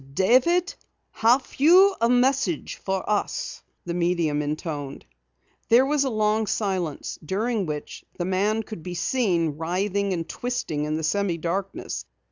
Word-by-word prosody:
"David, 265 - +3 0.4
have 245 +4 +3
you 370 +7 +6
a 230 - +3
message 250 - +1
for 190 -1 -3
us?" 210 -1 -2 0.2
the 175 - -3
medium 170 -4 +1
intoned. 150 -2 -4 0.6
There 245 +3 +6
was 290 0 +2
a - - 0
long 215 -1 +1
silence, 185 -9 -2
during 205 +4 -1
which 150 -1 -6
the 175 - -2
man 205 +4 +1
could 215 -5 -8
be 180 +2 -6
seen 175 - 0
writhing 195 +4 -1
and 165 -3 -2
twisting 240 -12 -3
in 155 +1 -1
the 160 - -4
semi 190 +1 0
darkness. 185 +4 -4
195 Hz, 140 wpm, -25 LUFS, 170-235 Hz, 0.6 s, you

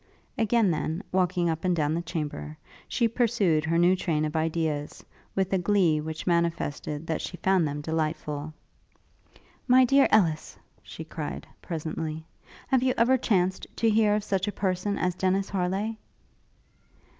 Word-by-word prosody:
Again, 225 -3 +2
then, 160 +1 -2
walking 180 -1 +1
up 160 -1 -2
and 180 -1 +2
down 150 -2 0
the 170 - -1
chamber, 145 - -5 0.3
she 235 - +1
pursued 220 -9 +1
her 165 +1 +1
new 175 +2 +5
train 155 -4 0
of 150 - -4
ideas, 160 -2 -2 0.3
with 190 0 0
a 190 - +3
glee 175 -4 +2
which 160 +1 -6
manifested 165 -3 -1
that 165 - -2
she 180 - -6
found 185 -1 +2
them 145 0 -4
delightful. 155 -1 -3 1.2
'My 255 0 +6
dear 275 +2 +5
Ellis,' 165 -8 +2 0.2
she - - -9
cried, - - -6 0.2
presently, 160 -1 -4 0.4
'have 265 -2 +3
you 255 0 +1
ever 245 +3 +4
chanced 190 -7 0
to 225 -1 +2
hear 210 -1 +3
of 210 - -1
such 195 -1 -1
a - - 0
person 190 +1 -1
as 180 0 0
Dennis 190 +2 0
Harleigh?' 195 +3 -1
180 Hz, 155 wpm, -27 LUFS, 160-200 Hz, 1.2 s, My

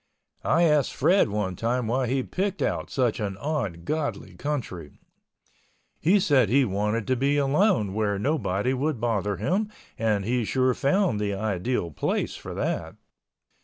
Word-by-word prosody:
I 170 - +3
asked 150 -4 +3
Fred 190 - +4
one 100 -3 -2
time 120 +3 -1
why 125 +3 0
he 130 +2 0
picked 195 +5 -2
out - - -1
such 125 -5 0
an 100 -3 -3
ungodly 145 - -3
country. 115 - -4 1.1
He 185 +7 +4
said 135 - +3
he 135 +3 +4
wanted 105 +2 -1
to 130 - +1
be 140 +3 +1
alone 140 - +2
where 105 -1 0
nobody 115 -2 0
would 135 0 -1
bother 105 -4 0
him 190 - 0 0.3
and 105 -3 +1
he 120 +2 +1
sure 130 +3 +2
found 160 - +1
the 100 -1 -1
ideal 100 -2 -1
place 70 - -1
for - - -8
that. - - -2
125 Hz, 150 wpm, -26 LUFS, 105-145 Hz, 1.1 s, Fred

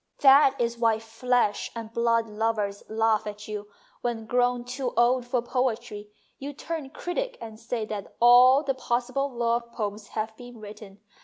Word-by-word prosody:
" - - -48
That 275 -1 +6
is 235 0 -1
why 225 -2 +3
flesh 225 0 0
and 230 -1 -7
blood 230 -1 +2
lovers 210 -2 -2
laugh 220 -1 +1
at 210 0 -7
you 210 -1 -6 0.3
when, 235 -2 -3
grown 245 +1 +1
too 250 0 -4
old 245 +1 +3
for 245 -1 0
poetry, 235 -4 -2 0.3
you 285 +2 -6
turn 305 -1 -5
critic - - -4
and 220 -1 -9
say 230 -1 -3
that 210 -2 -7
all 250 +4 +7
the 275 -2 0
possible 255 +2 -1
love 235 -1 -1
poems 210 -1 -4
have 220 0 -2
been 245 -1 -12
written. 205 -1 -11
235 Hz, 165 wpm, -26 LUFS, 220-250 Hz, 0.3 s, all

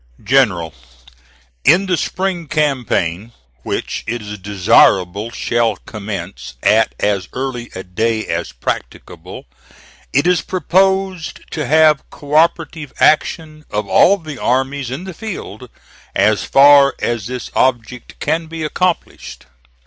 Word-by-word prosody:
"GENERAL: 100 - +2 0.9
In 180 +5 +5
the 185 -1 +1
spring 180 -1 -3
campaign, 120 - -1 0.3
which - - -4
it 115 0 -3
is 105 0 -7
desirable 95 +1 +3
shall 115 -2 0
commence 100 - -7
at - - +3
as 100 -2 0
early 125 -2 -4
a 95 - -6
day 110 +4 -1
as 85 +1 -3
practicable, - - -6 0.7
it 140 +4 +2
is 180 -2 +3
proposed 190 0 0
to 150 -3 -3
have 155 -1 +3
cooperative 155 0 0
action 155 0 +1
of 105 -1 -3
all 195 - +5
the 155 -7 -9
armies 135 +1 -1
in 135 +7 -5
the 190 -1 -7
field, 145 - -8 0.5
as - - +2
far 140 0 +6
as 115 -4 -2
this 125 -1 -6
object 125 -1 -1
can 160 +2 -1
be 165 0 -6
accomplished. 180 +3 -3
135 Hz, 120 wpm, -17 LUFS, 105-160 Hz, 0.9 s, far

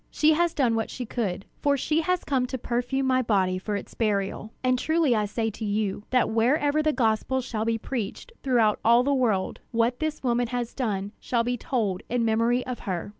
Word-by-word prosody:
She 310 +1 +3
has 340 +1 +1
done 255 -6 +2
what 225 -1 -1
she 250 - -5
could; 200 -5 -3
for 285 -1 +2
she 305 +4 +1
has 360 +2 0
come 260 -3 0
to 260 - -4
perfume 245 +3 -1
my 255 0 +3
body 190 -6 +1
for 205 +2 -3
its 200 - -6
burial. 210 -1 -1
And 255 0 +2
truly 315 -5 +2
I 210 -1 +1
say 225 +2 -2
to 215 - -8
you, 205 -1 -1
that 250 -1 +3
wherever 285 +7 +2
the 310 0 +2
gospel 245 0 +1
shall 225 -4 -3
be 230 0 +1
preached 230 - -5
throughout 235 -5 +2
all 235 +2 +5
the 280 +2 +1
world, 225 -8 0
what 235 +1 +1
this 310 -2 -3
woman 240 -1 +1
has 245 -1 -3
done 205 -6 -2
shall 235 -2 0
be 245 +1 -1
told 220 -7 -1
in 240 -1 +1
memory 230 +3 +2
of 250 -1 -5
her." 180 +1 -3
240 Hz, 210 wpm, -26 LUFS, 220-260 Hz, -, all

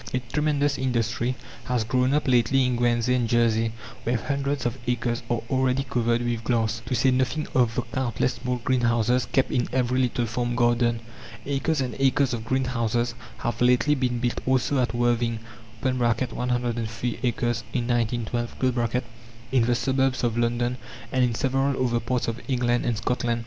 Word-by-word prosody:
A - - +2
tremendous 145 -2 +1
industry 120 -1 0 0.3
has 125 -3 0
grown 125 +4 +1
up 150 - 0
lately 130 +1 +3
in 125 -1 +1
Guernsey 120 0 +2
and 120 -3 +1
Jersey, 115 -1 +2 0.3
where 120 +1 0
hundreds 140 +1 -2
of 120 +2 -2
acres 120 -1 0
are 120 -2 0
already 130 0 +1
covered 120 -2 0
with 120 -1 -2
glass 115 -1 0
to 130 - 0
say 130 +3 +3
nothing 130 +4 0
of 120 -3 +2
the 125 - 0
countless 125 +1 -1
small 125 +1 -3
greenhouses 120 -1 +2
kept 135 - +1
in 120 - +1
every 130 0 +1
little 120 -1 0
farm 120 +1 -2
garden. 120 -1 +2 0.4
Acres 140 +2 0
and 125 -3 -3
acres 135 -1 +3
of 115 -1 -4
greenhouses 120 -2 0 0.2
have 120 0 -3
lately 125 +4 +4
been 125 -3 0
built 120 0 -1
also 130 +1 +2
at 120 -2 0
Worthing 120 -1 +1 0.4
(103 120 -2 -1
acres 120 -2 0
in 120 -2 -1
1912), 120 +1 0 0.5
in 130 -2 +4
the 120 0 +2
suburbs 130 0 +1
of 115 -2 +1
London, 120 +1 0 0.3
and 130 -1 +2
in 120 -2 +1
several 135 +2 +1
other 120 -1 +1
parts 120 +2 -1
of 115 +1 -3
England 125 0 +1
and 120 -2 0
Scotland. 120 0 -1
120 Hz, 165 wpm, -25 LUFS, 120-130 Hz, 0.5 s, lately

